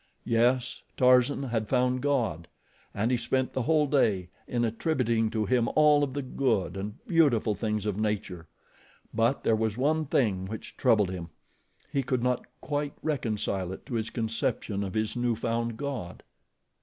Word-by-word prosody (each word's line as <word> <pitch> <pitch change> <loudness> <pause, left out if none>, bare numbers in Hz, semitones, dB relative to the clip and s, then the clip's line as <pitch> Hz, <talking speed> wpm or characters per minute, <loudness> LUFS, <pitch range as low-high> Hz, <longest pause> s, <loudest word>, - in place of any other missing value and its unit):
Yes, 120 +2 +1 0.2
Tarzan 125 +2 +4
had 115 -5 -2
found 125 0 +2
God, 115 - 0 0.4
and 110 +4 0
he 125 - +3
spent 130 +2 0
the 130 - -1
whole 150 +4 +3
day 105 -11 +1 0.2
in 120 -1 0
attributing 115 -2 0
to 110 -1 -1
Him 120 +2 +2
all 150 -1 +5
of 135 -2 -2
the 140 0 -3
good 110 -9 0
and 100 +2 -5
beautiful 140 -10 +3
things 105 -1 -2
of 105 -1 -1
nature; 95 -6 -2 0.7
but 115 +4 +1
there 115 - +3
was 110 0 -1
one 155 +4 +1
thing 100 -9 +1
which 110 +2 -7
troubled 110 -8 +3
him. 85 -3 -6 0.6
He 140 - +1
could 125 -2 -1
not 125 -1 0
quite 145 -1 -2
reconcile 110 - -1
it 95 - -9
to 130 - -8
his 115 -1 -1
conception 110 -3 -2
of 95 +1 -5
his 110 0 -1
new 120 -1 +1
found 115 0 -2
God. 130 -11 -5
115 Hz, 165 wpm, -28 LUFS, 105-130 Hz, 0.7 s, all